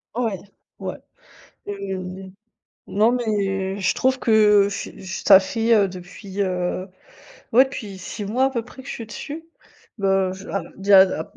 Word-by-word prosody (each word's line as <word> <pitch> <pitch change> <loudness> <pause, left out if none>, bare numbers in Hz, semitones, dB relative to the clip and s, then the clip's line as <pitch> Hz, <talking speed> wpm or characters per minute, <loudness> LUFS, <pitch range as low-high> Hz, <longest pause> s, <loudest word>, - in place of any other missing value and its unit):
Ouais, 225 -6 -1 0.4
ouais - - -4 0.7
et 200 -1 -4 0.9
non 215 +4 +3
mais 200 -5 -1
je 180 -2 +1
trouve 260 0 +1
que 210 -4 +4
ce 200 - -5
ça 190 +1 +5
fait, 225 +4 +1
heu, 200 -2 +4
depuis 185 +2 -7
heu, 185 0 -1 0.7
ouais, 255 +3 +7
depuis 215 -7 -7
6 200 +3 -6
mois 250 +6 +1
à 270 - +2
peu 235 -3 -2
près 255 +3 -13
que 270 - -12
je - - -3
suis 230 - -7
dessus. 295 +9 -7 0.5
Bah 195 -2 +1
je 190 +1 -10
alors 190 -4 -4
déjà 195 -1 +7
la 170 -4 -3
200 Hz, 160 wpm, -22 LUFS, 190-230 Hz, 0.9 s, ouais